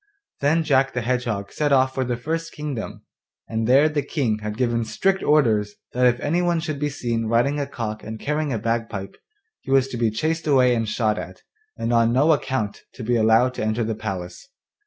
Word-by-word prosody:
Then 155 +4 +2
Jack 135 -3 +2
my 125 - 0
Hedgehog 115 -5 -2
set 150 -1 0
off 130 -1 +4
for 130 - -1
the 120 -1 -2
first 165 +6 -3
kingdom, 145 -7 -5 0.4
and 110 0 -2
there 135 +5 +6
the 150 -1 -1
King 125 -6 -1
had 105 0 -5
given 120 -2 +1
strict 190 - 0
orders 110 -9 +2 0.2
that 125 0 +4
if 120 0 +2
anyone 170 +2 +1
should 155 -3 -4
be 150 0 0
seen 115 -5 -2
riding 120 +6 +2
a 140 - -2
cock 110 -5 -5
and 110 +1 -7
carrying 150 0 -1
a 115 - 0
bagpipe 115 -3 -3 0.4
he - - -13
was 135 -1 +4
to 125 - -5
be 115 -1 +2
chased 155 +9 -2
away 130 -4 +4
and 115 -2 -1
shot 105 -1 0
at, - - -9 0.3
and 120 - -1
on 115 0 +4
no 140 +6 +4
account 130 -7 -1
to 125 - -7
be 120 +2 +1
allowed 115 +3 +4
to - - -4
enter 110 +2 0
the 110 0 -1
palace. 95 - -6
125 Hz, 205 wpm, -23 LUFS, 110-145 Hz, 0.4 s, there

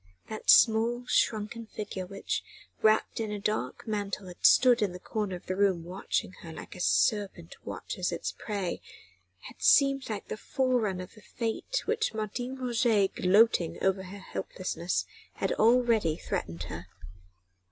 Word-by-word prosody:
That 215 - -6
small, 235 +2 +5
shrunken 225 -1 0
figure 195 -4 -6
which, 195 +1 -3 0.4
wrapped 215 +1 +3
in 220 -2 -2
a 210 - -2
dark 210 +2 -2
mantle, 205 -2 -3
had 180 - -13
stood 250 -2 +6
in 200 -4 +1
the 180 - -8
corner 205 -1 -3
of 175 - -11
the 185 - -2
room 190 -4 +2
watching 180 +1 -2
her 165 - -9
like - - -9
a - - -11
serpent 165 - +1
watches - - -4
its - - -3
prey, 200 -5 -4 0.6
had - - -12
seemed 275 -2 +4
like 210 -2 -4
the - - -5
forerunner 230 -8 0
of 180 - -13
the 215 - -16
fate 230 - -3
with 450 +1 0
which 440 - 0
Martin 240 +4 -3
Roget, 235 -5 +2
gloating 185 -2 +3
over 190 0 +2
her 190 +2 -9
helplessness, 185 -2 -3 0.3
had - - -1
already 225 -7 +3
threatened 85 - -4
her. 85 +1 -7
210 Hz, 155 wpm, -29 LUFS, 185-230 Hz, 0.6 s, stood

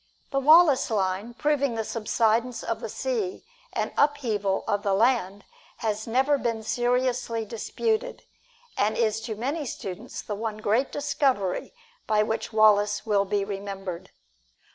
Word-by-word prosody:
The 275 - +1
Wallace 300 -1 +6
Line, 200 +2 -1
proving 280 -3 +1
the 225 - -1
subsidence 225 +2 0
of - - -2
the - - -5
sea 440 -7 -3 0.3
and - - -2
upheaval 225 -10 +1
of 205 - 0
the 200 -2 +1
land, 205 -3 +1 0.3
has 220 0 -2
never 265 +5 +2
been 230 -3 -2
seriously 245 -1 0
disputed, 440 - -2 0.5
and 210 +2 +1
is 225 -1 +1
to 220 -2 -4
many 275 +8 -2
students 195 -8 -6
the 210 - -4
one 215 +1 -4
great 220 +5 +1
discovery 265 -9 0 0.4
by 215 -1 +3
which 220 +2 -3
Wallace 210 -1 +4
will 205 -2 +2
be 200 0 0
remembered. 195 -3 -6
225 Hz, 140 wpm, -26 LUFS, 205-260 Hz, 0.5 s, Wallace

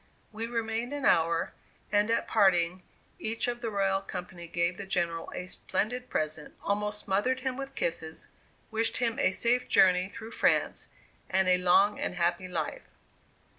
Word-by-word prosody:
We 225 +1 -4
remained 230 +2 -2
an 285 -2 -3
hour, 165 0 +3 0.4
and 205 +1 +3
at 230 - +1
parting, 185 -4 +3 0.4
each 225 +2 -1
of 240 0 -3
the 230 - -2
royal 195 -2 +1
company 180 -2 -7
gave 170 +2 0
the 200 - -7
General 170 -3 -1
a 180 - -4
splendid 245 +6 -2
present, 155 0 -2
almost 210 +1 -1
smothered 230 +7 +1
him 260 -1 -2
with 270 0 -7
kisses, 160 -1 -2 0.4
wished 225 +1 +2
him 240 +1 0
a 235 - +3
safe 245 +6 +1
journey 185 0 +4
through 220 +2 -9
France, - - +1 0.4
and 190 0 +2
a 180 0 +4
long 190 +3 +4
and - - -2
happy 175 +1 0
life. 165 -4 -4
195 Hz, 160 wpm, -29 LUFS, 180-230 Hz, 0.4 s, journey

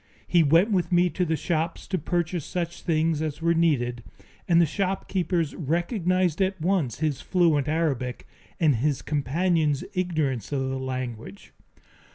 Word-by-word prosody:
He 175 - +4
went 165 +8 +4
with 185 -2 0
me 175 0 +3
to 180 - 0
the 160 -1 0
shops 165 0 -2
to 185 - 0
purchase 170 0 -1
such 170 +1 -4
things 160 -2 +1
as 155 -2 -3
were 170 +1 +2
needed, 125 -8 +1 0.4
and 170 -1 +5
the 170 - +6
shopkeepers 185 -3 -1
recognized 175 - 0
at 190 0 0
once 160 - 0
his 150 -4 0
fluent 160 -6 +2
Arabic 145 -6 -1 0.3
and 150 -7 +3
his 140 +2 0
companion's 150 +1 0
ignorance 155 - -1
of 135 -2 -1
the 135 0 -3
language. 125 -6 -6
165 Hz, 150 wpm, -25 LUFS, 140-175 Hz, 0.4 s, the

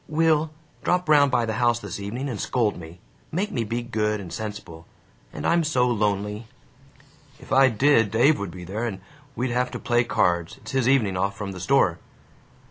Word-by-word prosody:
"Will, 160 0 +2 0.3
drop 180 0 +1
round 145 -2 +5
by 120 -2 +1
the 110 - -2
house 120 -1 +3
this 120 - -7
evening 115 +8 -4
and 115 -7 -4
scold 115 -5 0
me. 85 0 -11 0.3
Make 190 +6 -1
me 120 - -1
be 115 +3 -3
good 105 -3 -1
and 90 -5 -8
sensible. 100 -7 -7 0.4
And 75 - -6
I'm 170 0 +3
so 130 -5 +2
lonely." 105 -1 -1 0.9
"If - - -15
I 135 0 +6
did, 115 -2 +3
Dave 120 +9 +3
would 100 -2 -4
be 90 +1 -9
there, 105 +7 -4
and 95 -4 -5 0.4
we'd 125 0 -2
have 125 +1 0
to - - -6
play 120 -2 +2
cards. 85 -7 0
It's 110 +1 -10
his 130 -2 +1
evening 110 -9 +2
off 100 +2 -1
from 100 -1 -5
the 95 - -8
store." 95 -5 +2
115 Hz, 195 wpm, -24 LUFS, 100-130 Hz, 0.9 s, I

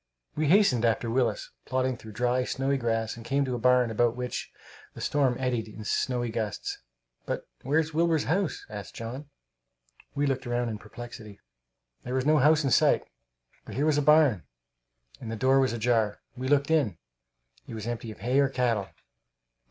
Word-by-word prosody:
We 155 0 0
hastened 165 - +4
after 115 0 +1
Willis, - - 0
plodding 130 0 0
through 110 -2 -11
dry, 125 +3 +1
snowy 135 +2 -1
grass, 115 -3 -1
and 115 - -10
came 140 +4 +1
to 130 - -3
a 120 - -2
barn 125 -1 +4
about 120 +1 +2
which 125 0 -4 0.4
the - - -9
storm 135 -4 +1
eddied 125 -4 -1
in 110 0 -9
snowy 120 0 0
gusts. 110 -2 -3 0.5
"But - - -3
where's 155 +4 0
Wilbur's 165 -1 +2
house?" 180 +3 -1
asked 105 -4 -8
John. 130 +6 -7 0.9
We 145 - +1
looked 135 -2 -1
round 120 -1 -1
in 105 - -6
perplexity. 115 -4 -10 0.6
There 125 +1 -4
was 130 0 0
no 155 0 +4
house 150 +3 +4
in 135 - 0
sight; - - +4 0.6
but - - -9
here 140 +4 +1
was 150 -2 +3
a - - +2
barn, 150 - +5 0.8
and 115 - -6
the - - -3
door 130 +4 +3
was 130 -3 +2
ajar. 115 -2 +1 0.2
We 130 +1 -4
went 145 +1 +2
in. 135 - +2 0.7
It - - -7
was 110 -1 -6
empty 120 -1 -4
of 110 - -10
hay 125 +3 +2
or 140 -1 +4
cattle. 120 -7 0
125 Hz, 180 wpm, -28 LUFS, 115-140 Hz, 0.9 s, barn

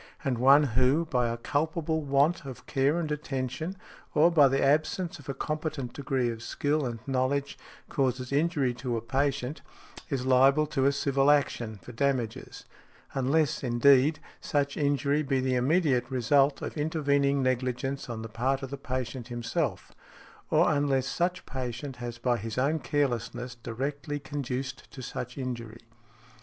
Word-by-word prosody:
And 130 -5 -1
one 140 +4 +7
who, 130 +5 +2
by 125 -6 +1
a 115 - -3
culpable 160 +5 -1
want 145 +4 +2
of 135 -3 -9
care 140 +4 +1
and 155 -3 -3
attention, 150 +4 -3 0.4
or 165 +3 +6
by 150 -4 +6
the 135 +1 +1
absence 155 +5 +1
of 145 - -12
a 135 - -2
competent 150 -5 -3
degree 135 -4 -1
of 115 -1 -8
skill 145 +4 -1
and 120 -1 -4
knowledge, 135 +1 0 0.3
causes 130 -2 -1
injury 145 -3 +1
to 125 -3 -1
a - - -3
patient, 135 +2 -1 0.5
is 135 -4 -2
liable 135 +3 +5
to 135 -3 0
a - - +4
civil 140 0 +2
action 120 -7 +1
for - - -9
damages; 125 -2 -2 0.5
unless, 140 +3 +1
indeed, 135 +4 +4 0.2
such 145 -1 -1
injury 145 0 +1
be 135 -2 0
the 130 0 0
immediate 130 -1 +2
result 135 +2 +2
of - - -5
intervening 140 -3 +1
negligence 130 +1 -1
on 115 -2 -5
the - - -5
part 130 +5 -1
of 135 - -6
the 140 - -4
patient 130 -2 -4
himself; 120 -1 -2 0.6
or - - +4
unless 140 -3 +1
such 175 +5 -1
patient 130 0 -5
has 120 -1 -6
by 120 0 +1
his 110 +1 -6
own 145 +5 +2
carelessness 125 -4 -1
directly 135 +5 -4
conduced 135 -2 -5
to 130 - -9
such 125 +2 -6
injury. 115 -4 -5
135 Hz, 155 wpm, -28 LUFS, 125-145 Hz, 0.6 s, one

